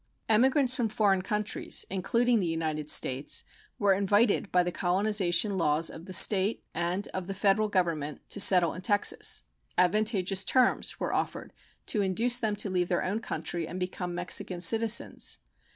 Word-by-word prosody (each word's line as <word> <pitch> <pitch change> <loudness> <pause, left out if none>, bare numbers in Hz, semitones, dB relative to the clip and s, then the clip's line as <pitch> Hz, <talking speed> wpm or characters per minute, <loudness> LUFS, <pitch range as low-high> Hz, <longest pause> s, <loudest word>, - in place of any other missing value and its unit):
Emigrants 255 +3 +3
from 235 -4 -1
foreign 200 -3 +1
countries, 210 +1 -2
including 230 +5 0
the 180 - -1
United 155 -2 -3
States, 130 0 +1 0.3
were 200 -2 +2
invited 205 +2 +1
by 180 0 +3
the 175 - -3
colonization 190 +1 0
laws 160 0 +1
of 165 - -11
the 185 - -10
State 195 +3 +4
and 175 +4 -2
of 185 -1 -6
the 195 - -5
Federal 205 +1 +1
Government 165 -7 -2
to - - -2
settle 180 -4 +4
in 185 - -8
Texas. 205 +2 +1 0.3
Advantageous 195 0 +2
terms 255 +2 +1
were - - -3
offered - - -4 0.3
to 210 - 0
induce 230 +6 +1
them 220 -3 -1
to 205 0 +1
leave 180 -2 -1
their 175 - 0
own 200 +4 -2
country 170 -5 -5
and 180 +3 -7
become 180 -1 -5
Mexican 175 0 -2
citizens. 225 +6 +1
190 Hz, 160 wpm, -28 LUFS, 175-215 Hz, 0.3 s, State